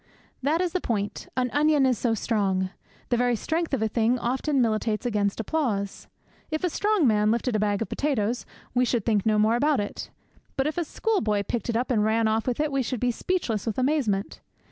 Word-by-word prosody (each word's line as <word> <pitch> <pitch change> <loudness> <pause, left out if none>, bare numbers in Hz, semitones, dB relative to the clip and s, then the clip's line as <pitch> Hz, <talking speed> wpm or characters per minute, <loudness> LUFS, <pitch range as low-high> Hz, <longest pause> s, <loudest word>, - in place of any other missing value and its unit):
That 305 +6 +1
is 360 -2 0
the 370 - 0
point: 205 -3 -3
an 250 -1 +1
onion 295 -1 +3
is 255 -1 +3
so 230 0 0
strong. 195 -4 0 0.4
The 245 - +2
very 245 0 +2
strength 325 - -2
of 265 -5 0
a - - +2
thing 230 +3 +1
often 265 +4 0
militates 220 -1 0
against 205 -4 0
applause. 220 -6 -2 0.4
If 310 +2 -3
a 360 - +1
strong 415 -4 +2
man 210 -3 +3
lifted 235 +1 0
a - - +2
bag 205 0 +1
of - - -10
potatoes 245 -5 -1 0.3
we 250 0 +3
should 240 -4 0
think 215 -2 +1
no 215 -1 +3
more 215 +2 +3
about 290 +2 +2
it; 205 0 -4 0.5
but 270 - +1
if 310 +3 -1
a 340 - -1
schoolboy 220 - 0
picked 240 0 -3
it 230 - +1
up 250 +2 -1
and 215 -4 +3
ran 220 +1 +2
off 220 +2 0
with 250 +1 -1
it 305 -1 +1
we 275 -1 +1
should 255 0 -3
be 245 +1 +1
speechless 240 - -2
with 220 - -2
amazement. 255 -7 0
240 Hz, 215 wpm, -26 LUFS, 215-280 Hz, 0.5 s, onion